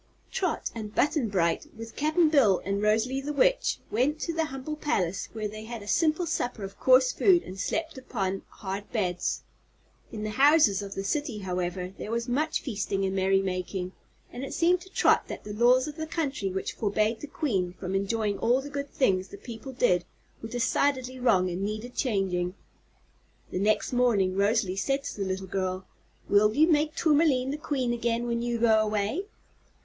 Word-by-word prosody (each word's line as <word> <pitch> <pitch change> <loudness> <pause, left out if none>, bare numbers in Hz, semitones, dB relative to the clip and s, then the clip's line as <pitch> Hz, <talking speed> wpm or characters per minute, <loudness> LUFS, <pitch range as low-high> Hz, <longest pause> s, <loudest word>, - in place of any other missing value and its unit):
Trot 365 -4 -1
and 215 -2 -7
Button 285 -5 +2
Bright, 170 -4 0
with 225 0 -9
Cap'n 310 +2 +3
Bill 245 - +4
and 200 +1 -1
Rosalie 225 +6 +1
the 290 +2 -4
Witch, 400 - +2
went 265 +8 +1
to 335 - -2
the 325 -1 0
humble 270 +1 -5
palace, 195 - -1
where 215 -1 -3
they 215 +1 -8
had 230 -2 -7
a - - -12
simple 320 - +2
supper 245 -9 -2
of 195 0 -8
coarse 255 0 +5
food 360 -4 +4
and 190 +1 -9
slept 320 - -2
upon 195 -7 -3
hard 200 0 -6
beds. 180 -6 -1 0.7
In 215 -1 -5
the 215 - -2
houses 270 -6 +5
of 200 -1 -7
the 195 - -3
City, 285 +2 -2
however, 180 -1 -3
there - - -5
was 235 +1 -2
much 300 +6 0
feasting 200 -5 -2
and 190 0 -1
merrymaking, 190 -1 0 0.4
and 245 - -6
it 270 - -5
seemed 355 +1 +3
to 380 - -13
Trot - - +3
that - - -7
the 210 - -6
laws 245 +4 +4
of 300 +1 -7
the 315 0 -4
country 280 - -2
which 190 +1 -3
forbade 215 +1 0
the 295 - -7
Queen 200 - -1
from 185 0 -5
enjoying 205 +1 0
all 245 +3 +3
the 285 +1 -8
good 280 0 -4
things 190 -10 +1
the 200 - -10
people 235 +4 -8
did 210 -9 +2 0.4
were 225 - -6
decidedly 255 +2 0
wrong 190 -7 +3
and 180 +1 -3
needed 215 +4 -4
changing. 190 -7 -1 1.0
The - - -2
next 210 +4 +1
morning 215 -7 +2
Rosalie 200 -1 +2
said 275 +7 0
to 280 - -6
the 195 - -1
little 190 0 -3
girl: 185 0 -3 0.4
"Will 210 +1 +4
you 310 +3 +5
make 305 -2 +2
Tourmaline 290 -5 +3
the 290 - -3
Queen 265 -6 -1
again, 235 0 -1
when 235 -1 -1
you 240 0 -1
go 225 -1 +4
away?" 215 - -1
225 Hz, 185 wpm, -27 LUFS, 195-275 Hz, 1.0 s, coarse